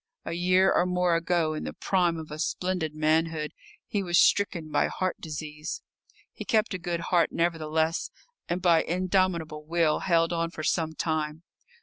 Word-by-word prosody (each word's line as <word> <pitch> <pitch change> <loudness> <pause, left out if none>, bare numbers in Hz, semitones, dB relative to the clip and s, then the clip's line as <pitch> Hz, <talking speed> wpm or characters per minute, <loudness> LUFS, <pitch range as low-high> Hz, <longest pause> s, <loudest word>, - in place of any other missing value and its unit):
A 165 - -3
year 185 +2 +3
or 180 - +3
more 180 -1 +2
ago, 165 -1 +1
in 155 - -4
the - - -5
prime 175 -3 +1
of 155 -1 -8
a 150 - -6
splendid 175 -1 -2
manhood, 155 0 +1 0.3
he 205 - -1
was 175 -2 +1
stricken 170 -6 +2
by - - +2
heart 185 -1 -2
disease. 150 0 -6 0.5
He - - -7
kept 220 -1 +1
a 185 - -3
good 170 -1 -3
heart, 175 -2 +3
nevertheless, 160 -1 0 0.4
and 175 +2 -2
by 170 -3 +5
indomitable 175 -3 0
will 165 -1 +1
held 165 -1 +2
on 165 0 0
for 160 -2 -7
some 160 0 0
time. 155 0 -2
165 Hz, 165 wpm, -27 LUFS, 155-180 Hz, 0.5 s, by